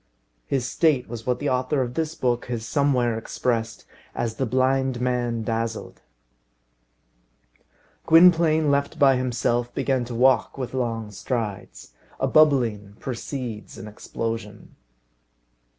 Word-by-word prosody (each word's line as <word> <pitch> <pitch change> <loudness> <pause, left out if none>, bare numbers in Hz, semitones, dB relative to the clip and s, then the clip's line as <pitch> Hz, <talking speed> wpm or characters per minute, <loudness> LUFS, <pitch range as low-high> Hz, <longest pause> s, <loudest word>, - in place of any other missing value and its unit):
His 135 -3 -1
state 150 -2 +1
was 115 0 -8
what 125 -1 +1
the 145 - -2
author 130 +3 0
of 120 -1 -5
this 160 +2 -2
book 120 -5 0
has 120 -2 -4
somewhere 125 -5 +1
expressed 115 -1 -2 0.3
as 115 -2 -3
the 130 - -1
blind 130 +1 +1
man 120 -2 -1
dazzled. 115 0 -4 2.1
Gwynplaine, 165 -2 +5
left 140 0 0
by 135 -2 +5
himself, 120 -1 -1
began 135 -2 0
to 120 0 -6
walk 130 +1 +3
with 130 -2 -5
long 115 -4 -2
strides. 105 - -5 0.3
A - - +1
bubbling 120 -10 +3
precedes 125 -3 -6
an 110 - -8
explosion. 105 0 -6
125 Hz, 120 wpm, -24 LUFS, 115-135 Hz, 2.1 s, Gwynplaine